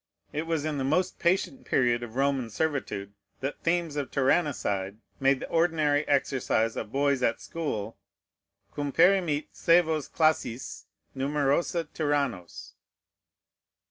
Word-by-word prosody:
It 155 +2 -3
was 160 -3 -1
in 150 -2 -2
the - - -1
most 180 +7 0
patient 190 +9 0
period 120 -2 +2
of 120 -1 -8
Roman 135 -3 +1
servitude 105 -6 -2 0.3
that 135 +2 -4
themes 170 -2 0
of 145 -2 -2
tyrannicide 130 - 0 0.2
made 135 0 +3
the - - -6
ordinary 155 -3 +2
exercise 130 -5 +1
of 105 - -5
boys 140 -1 +1
at 115 -2 +1
school, 115 -10 -4 0.8
cum 145 -1 -2
perimit 170 -3 +3
sævos 160 -3 +2
classis 155 -6 0 0.3
numerosa 145 +4 0
tyrannos. 140 - -2
145 Hz, 120 wpm, -28 LUFS, 130-160 Hz, 0.8 s, made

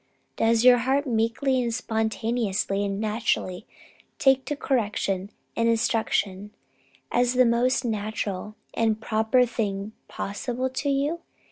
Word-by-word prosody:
Does 225 0 +2
your 250 -1 +7
heart 270 +4 +1
meekly 250 +2 +1
and 235 -1 -1
spontaneously 220 -3 -1
and 200 0 -2
naturally 215 -4 -1 0.5
take 265 -1 +3
to 295 - -2
correction 205 -8 -1 0.3
and 230 0 +2
instruction 210 -3 0 0.6
as 245 +1 +2
the 255 0 +5
most 245 +3 +2
natural 210 -2 -3 0.2
and 220 -1 +1
proper 220 +3 +2
thing 210 -3 -3 0.2
possible 245 +6 -3
to 280 +2 -2
you? 285 +4 0
230 Hz, 120 wpm, -25 LUFS, 210-250 Hz, 0.6 s, your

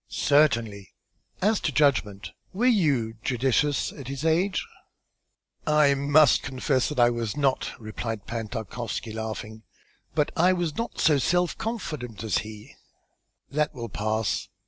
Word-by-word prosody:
"Certainly. 115 -9 +1 0.5
As 215 +1 +3
to 155 - -1
judgment, 120 -9 +1 0.2
were 220 +6 0
you 145 - +2
judicious 135 +3 +1
at 135 -4 -10
his 140 +3 -5
age?" 180 +4 +1 1.0
"I 150 -2 +5
must 140 +1 +4
confess 130 0 0
that 150 - -4
I 120 0 +5
was 120 +2 -3
not," 140 -2 0
replied 110 -1 -5
Pan 115 -2 -4
Tarkowski, 110 +1 -5
laughing, 110 0 -6 0.5
"but 150 -2 +1
I 180 +2 +4
was 175 -4 -2
not 230 - -4
so 150 -3 +4
self 175 +6 +1
confident 150 - -5
as 110 - +1
he." 105 -1 -10 0.8
"That 150 +1 0
will 120 -2 -6
pass. 110 +1 -1
135 Hz, 135 wpm, -26 LUFS, 110-155 Hz, 1.0 s, I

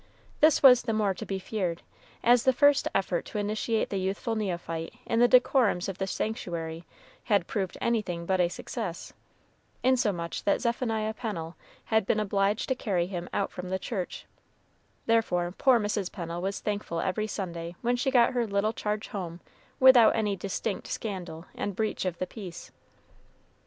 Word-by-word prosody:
This 310 -1 +5
was 250 -3 +9
the 230 -2 -2
more 210 -3 +1
to - - -8
be 195 - -2
feared, 185 -3 -3 0.4
as 240 0 +6
the 260 +2 +3
first 285 +1 +4
effort 190 -3 0
to - - -6
initiate 215 +2 -1
the 195 - -1
youthful 195 +5 -2
neophyte 175 -4 -3
in 230 - 0
the 245 - +6
decorums 245 -6 +4
of 195 -1 -5
the 190 - -1
sanctuary 170 -6 -4 0.4
had 200 -6 +2
proved 190 -3 -3
anything 195 -8 -1
but 185 +1 +1
a 175 -1 +3
success, 185 -1 -6 0.7
insomuch 205 -10 +1
that 200 - +2
Zephaniah 225 -3 -1
Pennel 180 -9 -5 0.3
had 220 -3 +1
been 215 - +2
obliged 200 0 0
to - - +3
carry 195 -8 -1
him 175 -1 -5
out 200 - -1
from 180 0 -7
the 190 - 0
church; 190 -1 -5 0.8
therefore, 180 -6 +1
poor 255 -3 +4
Mrs. 205 -3 -2
Pennel 170 -1 -5
was 195 +2 -3
thankful 205 -5 -3
every 215 +5 -1
Sunday 170 -4 -5
when 240 +1 +2
she 245 +2 0
got 245 -1 +4
her 240 -2 0
little 200 +2 0
charge 210 0 -3
home 175 -4 -5 0.4
without 260 -3 +7
any 210 -3 0
distinct 195 +1 -3
scandal 180 -6 -5
and 200 - -4
breach 215 -2 -1
of 180 -2 -2
the 185 - -2
peace. 185 -4 -9
200 Hz, 165 wpm, -28 LUFS, 180-225 Hz, 0.8 s, was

